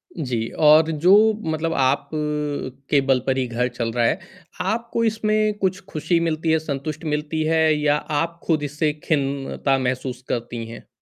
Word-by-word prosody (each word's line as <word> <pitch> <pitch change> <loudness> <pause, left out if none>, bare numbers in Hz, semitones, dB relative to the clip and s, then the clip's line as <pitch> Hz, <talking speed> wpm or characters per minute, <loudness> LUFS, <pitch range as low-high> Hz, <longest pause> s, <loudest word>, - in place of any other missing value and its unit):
जी, 125 -8 -2
और 155 +1 +5
जो 165 +5 +4 0.4
मतलब 160 +1 -1
आप 135 0 +1
अ, - - -1 0.7
के 145 - +4
बल 135 -1 +4
पर 135 0 +1
ही 130 - +1
घर 120 +1 -1
चल 115 -1 -3
रहा 120 0 +1
है, - - +1 0.4
आपको 230 +4 -1
इसमें 215 -1 +1
कुछ 190 0 0
खुशी 160 +2 0
मिलती 165 -1 0
है, 160 - +3
संतुष्ट 155 +1 -5
मिलती 150 +1 -1
है 160 0 +3 0.2
या 145 -1 +3 0.3
आप 170 0 -4
ख़ुद 155 -3 +1
इससे 150 +1 -1
खिन्नता 140 -2 0
महसूस 130 0 -3
करती 120 -1 -3
हैं? 115 - -11
150 Hz, 170 wpm, -22 LUFS, 130-165 Hz, 0.7 s, और